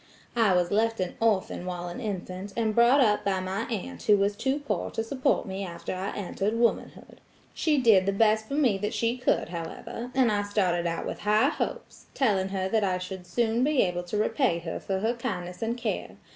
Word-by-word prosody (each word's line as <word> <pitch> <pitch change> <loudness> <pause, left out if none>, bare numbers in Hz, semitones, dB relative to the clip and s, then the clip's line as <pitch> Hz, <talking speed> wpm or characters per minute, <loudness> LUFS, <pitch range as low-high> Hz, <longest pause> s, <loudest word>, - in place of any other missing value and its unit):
I 220 -5 +4
was 175 -1 +1
left 225 +1 +1
an 185 -1 -2
orphan 210 -5 +1
while 175 -1 -4
an 175 - -6
infant, 195 -2 -5
and 220 -2 +1
brought 240 +5 +5
up 210 -4 +3
by 195 -2 0
my 190 +4 -3
aunt 185 - -5
who 210 - +4
was 200 +1 +1
too 265 +6 0
poor 290 -1 -2
to 225 - -3
support 260 +4 0
me 190 0 -4
after 175 -1 -5
I 185 +2 -3
entered 205 +2 -2
womanhood. 235 0 -1 0.3
She 305 -3 +1
did 220 -7 +5
the - - +3
best 220 +1 +2
for 275 - -3
me 250 -10 +2
that 210 +3 -2
she 230 +3 +1
could, 250 -9 0
however, 175 +7 -6
and 255 -4 +4
I 205 -1 +1
started 185 -4 0
out 165 0 -3
with - - -5
high 210 +1 +3
hopes, - - -5
telling 200 -8 +2
her 190 -1 -1
that 215 +2 +1
I 185 -2 +1
should 185 0 -7
soon 230 +5 +1
be 290 -1 +3
able 180 -1 -1
to 195 +4 -3
repay 215 - +1
her 165 -1 -5
for 190 -1 -2
her 225 +3 +1
kindness 180 -7 -5
and 230 +2 -1
care. 235 -3 -3
205 Hz, 215 wpm, -27 LUFS, 185-230 Hz, 0.3 s, brought